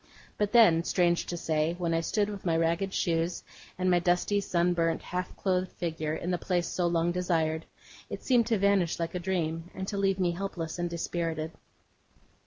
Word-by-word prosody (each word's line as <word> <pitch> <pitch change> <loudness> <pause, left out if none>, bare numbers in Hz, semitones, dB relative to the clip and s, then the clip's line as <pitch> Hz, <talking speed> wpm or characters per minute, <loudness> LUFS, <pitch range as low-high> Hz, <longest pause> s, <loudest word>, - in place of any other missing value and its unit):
But 210 -1 0
then, 195 -9 +6
strange 175 -1 +1
to 175 - -3
say, 160 0 0
when 170 -2 -1
I 165 - +2
stood 205 +5 0
with 205 -2 -6
my 165 -2 +1
ragged 170 +4 +1
shoes, 170 -1 0 0.3
and 185 0 0
my 175 - +4
dusty, 180 +4 +1
sunburnt, 170 -3 +1
half 180 0 -4
clothed 185 -1 0
figure, 160 -3 -3
in 175 - -3
the 175 - 0
place 175 -2 0
so 175 -1 0
long 170 0 +1
desired, 165 -3 0 0.4
it - - -6
seemed 245 -4 +3
to 230 -2 +2
vanish 195 -4 +2
like 165 -1 -2
a 180 - -2
dream, 170 -2 -2
and 190 0 -4
to 200 - -3
leave 195 -1 +2
me 180 -2 +2
helpless 175 -2 -4
and 175 0 -1
dispirited. 165 -2 -3
175 Hz, 190 wpm, -29 LUFS, 165-190 Hz, 0.4 s, then